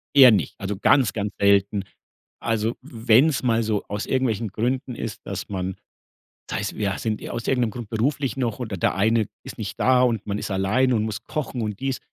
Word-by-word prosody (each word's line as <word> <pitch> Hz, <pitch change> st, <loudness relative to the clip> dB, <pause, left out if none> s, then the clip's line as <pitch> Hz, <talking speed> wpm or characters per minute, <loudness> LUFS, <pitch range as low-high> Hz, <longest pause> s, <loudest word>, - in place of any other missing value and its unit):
Eher 130 Hz, -3 st, +10 dB
nicht, 105 Hz, -, +1 dB
also, 100 Hz, +1 st, -3 dB
ganz, 125 Hz, +4 st, +4 dB
ganz 105 Hz, -1 st, -3 dB
selten. 100 Hz, 0 st, +3 dB, 0.6 s
Also, 115 Hz, 0 st, 0 dB
w 120 Hz, -4 st, -11 dB
wenn's 130 Hz, +5 st, +5 dB
mal 115 Hz, -2 st, +2 dB
so 110 Hz, -2 st, -1 dB
aus 105 Hz, +1 st, -3 dB
irgendwelchen 115 Hz, -4 st, 0 dB
Gründen 125 Hz, +5 st, -2 dB
ist, 115 Hz, -3 st, -5 dB
dass 100 Hz, 0 st, -5 dB
man 95 Hz, -1 st, -3 dB, 0.8 s
sei's, -, -, -2 dB
wir 100 Hz, -1 st, -1 dB
sind 110 Hz, -2 st, -2 dB
ir -, -, -6 dB
aus 120 Hz, -1 st, -4 dB
irgendeinem 125 Hz, -4 st, +1 dB
Grund 120 Hz, -2 st, -7 dB
beruflich 130 Hz, +4 st, 0 dB
noch 120 Hz, -5 st, -1 dB
oder 110 Hz, -6 st, -4 dB
der 85 Hz, -, +1 dB
eine 110 Hz, +2 st, +2 dB, 0.2 s
ist -, -, -9 dB
nicht 100 Hz, -2 st, -5 dB
da 130 Hz, -1 st, +4 dB
und 115 Hz, -5 st, +1 dB
man 105 Hz, 0 st, -2 dB
ist -, -, -5 dB
alleine 105 Hz, +7 st, +2 dB
und 110 Hz, -, +1 dB
muss 110 Hz, -1 st, -4 dB
kochen 135 Hz, -5 st, -3 dB
und 105 Hz, -2 st, -4 dB
dies 135 Hz, -1 st, -1 dB
110 Hz, 205 wpm, -24 LUFS, 100-125 Hz, 0.8 s, Eher